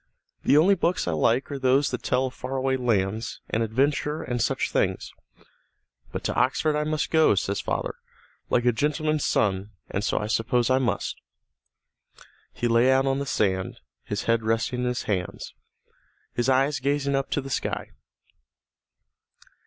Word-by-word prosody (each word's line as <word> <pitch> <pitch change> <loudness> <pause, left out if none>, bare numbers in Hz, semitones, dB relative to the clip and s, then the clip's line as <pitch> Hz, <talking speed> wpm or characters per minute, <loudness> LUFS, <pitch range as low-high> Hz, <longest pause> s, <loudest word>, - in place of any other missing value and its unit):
The 145 - +5
only 180 +6 +6
books 175 - 0
I - - +1
like 115 - +1
are 140 - -4
those 135 +2 +3
that 125 - -3
tell 130 - +1
of 130 - -5
far 130 +2 -5
away 135 0 +1
lands 110 -3 -1
and 110 - +1
adventures 140 +6 0
and 120 -1 -1
such 115 - 0
things. - - -1 1.0
But - - -5
to - - -1
Oxford 140 +4 +1
I 150 - +1
must 155 0 -1
go, 160 -9 +5
says 100 +1 -1
father, - - -2 0.6
like 120 - +2
a 120 - +5
gentleman's 150 +4 0
son, 100 0 0 0.2
and 100 - -2
so - - 0
I 105 - -1
suppose 115 +3 +1
I 130 - +4
must." 125 -3 -2 1.3
He 120 - -2
lay 120 +2 +4
out 135 +1 +3
on 135 0 +1
the 140 - -3
sand, 95 -5 0 0.2
his - - -3
head 115 -1 +2
resting 115 +2 0
in 125 - -1
his 125 0 -2
hands, 90 -4 -3 0.8
his 120 +2 0
eyes 135 +2 +2
gazing 140 +1 0
up 135 0 0
to - - 0
the 135 -1 -7
sky. - - -3
130 Hz, 170 wpm, -25 LUFS, 115-140 Hz, 1.3 s, only